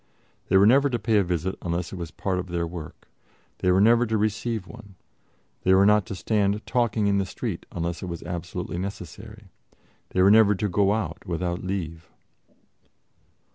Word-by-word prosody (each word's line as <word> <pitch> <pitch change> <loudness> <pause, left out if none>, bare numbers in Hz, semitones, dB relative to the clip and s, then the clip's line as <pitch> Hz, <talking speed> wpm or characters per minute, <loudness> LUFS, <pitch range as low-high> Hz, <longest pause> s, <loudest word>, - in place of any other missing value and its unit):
They 95 - +5
were 100 - +6
never 140 +6 +5
to 120 - -1
pay 110 0 +1
a 100 - +4
visit 90 +1 -2
unless 85 0 -3
it - - -4
was 85 -3 -6
part 95 +2 -2
of 90 - -5
their 85 -1 -2
work; 85 -2 -9 0.5
they 90 - +1
were 90 - +4
never 115 +3 +5
to 110 0 0
receive 110 0 -1
one; 105 -4 -13 0.7
they 95 +1 +4
were 95 +1 +5
not 105 -1 +4
to - - -5
stand 105 +1 0
talking 120 -3 0
in 100 0 +2
the 100 - 0
street - - -5
unless 85 0 -3
it 95 - -5
was 85 -2 -6
absolutely 85 0 -5
necessary; 100 +3 -8 0.6
they 95 - +2
were 100 - +6
never 105 -1 +6
to 105 +3 -1
go 100 +1 +2
out 105 -1 -3
without 90 0 -2
leave. 85 -4 -4
95 Hz, 185 wpm, -25 LUFS, 90-105 Hz, 0.7 s, were